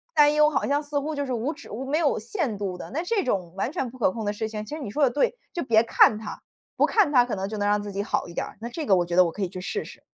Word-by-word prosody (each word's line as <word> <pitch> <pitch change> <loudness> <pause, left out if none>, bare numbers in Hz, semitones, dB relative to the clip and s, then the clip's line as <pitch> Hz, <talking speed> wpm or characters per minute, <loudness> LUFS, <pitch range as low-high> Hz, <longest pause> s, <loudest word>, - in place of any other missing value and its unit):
担 295 0 +6
忧 300 0 +5
好 295 - 0
像 285 +2 +1
似 290 0 -1
乎 305 +2 -3
就 285 0 -2
是 260 - -5
无 245 +6 -1
止 - - -13
无 245 +5 -5
没 300 - +2
有 305 -4 +2
限 240 - -3
度 195 -3 -3
的。 - - -9
那 310 - -1
这 400 +2 0
种 180 - -2
完 200 +6 -2
全 270 -7 -2
不 255 - -13
可 230 - +2
控 220 +2 -5
的 205 - 0
事 220 +1 -3
情， 215 -1 -5
其 255 - -6
实 315 - -7
你 255 - -5
说 295 +6 +1
得 270 - +5
对， 475 - +1 0.2
就 345 - -2
别 225 -3 +4
看 225 -1 +5
它， 220 -1 -7 0.3
不 - - +4
看 425 -8 +3
它 250 -2 +7
可 245 - -3
能 195 0 -3
就 215 +1 -5
能 205 0 0
让 205 0 +2
自 205 0 -6
己 200 +1 -2
好 - - -1
一 170 - -10
点 - - -2
儿， - - -12
那 235 - -4
这 310 +5 -5
个 195 - +5
我 175 - +1
觉 170 0 -3
得 185 - +7
我 170 - -1
可 205 - -7
以 - - 0
去 185 0 -7
试 415 - -3
试。 - - -13
235 Hz, 370 characters per minute, -25 LUFS, 205-295 Hz, 0.3 s, 它